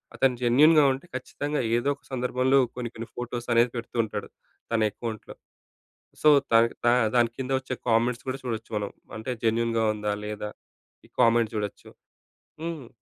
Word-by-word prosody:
అతను 130 -2 +2
జెన్యూన్‌గా 150 +6 +6
ఉంటే 135 - -8
ఖచ్చితంగా 145 +2 -3 0.2
ఏదో 140 +4 0
ఒక - - -34
సందర్భంలో 130 +1 +2 0.2
కొన్ని 120 -2 -3
కొన్ని 115 +1 -6
ఫోటోస్ 120 0 -5
అనేది 120 +1 +4
పెడుతూ 120 +1 -6
ఉంటాడు 105 -1 -6 0.4
తన 110 - +2
అకౌంట్‌లో. 110 0 -7 0.9
సో 155 - +6 0.2
దానికి 115 +1 +5
దా - - +6 0.2
దానికింద 120 +2 +1
వచ్చే 130 0 -5 0.2
కామెంట్స్ 120 +2 +2
కూడా 130 - -2
చూడొచ్చు 115 -2 -4
మనం. 100 -1 -3 0.3
అంటే 110 +4 -4
జెన్యూన్‌గా 115 0 +1
ఉందా? 105 0 -2
లేదా? 105 0 -5 0.6
ఈ - - -33
కామెంట్ 115 -1 +4
చూడొచ్చు. 105 -1 -4 0.7
హ్మ్. 165 -7 -5
120 Hz, 145 wpm, -26 LUFS, 115-130 Hz, 0.9 s, జెన్యూన్‌గా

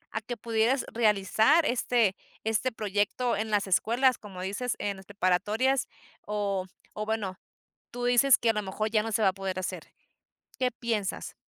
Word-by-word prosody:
a 220 - -1
que 240 +2 -5
pudieras 230 +4 +1
realizar 220 - +3
este 235 -5 +2 0.3
este 225 +4 0
proyecto 210 +3 -1
en 220 +2 -2
las 205 -1 +1
escuelas, 240 +7 +3
como 195 -3 -10
dices, 205 +6 -2
en 200 -1 -2
las 190 - -13
preparatorias, 205 +7 +1 0.4
o 200 -3 -1 0.3
o 215 0 -4
bueno, 210 -4 -2 0.5
tú 245 0 -5
dices 245 +2 +5
que 230 - +2
a - - +4
lo 210 -1 -2
mejor: 215 +3 -3
"Ya 215 -1 +2
no 225 0 -4
se 220 - +1
va 195 - +5
a - - +2
poder 190 -1 -4
hacer", 185 - -4 0.8
¿qué 255 -1 +1
piensas? 225 -4 -3
215 Hz, 175 wpm, -28 LUFS, 200-240 Hz, 0.8 s, dices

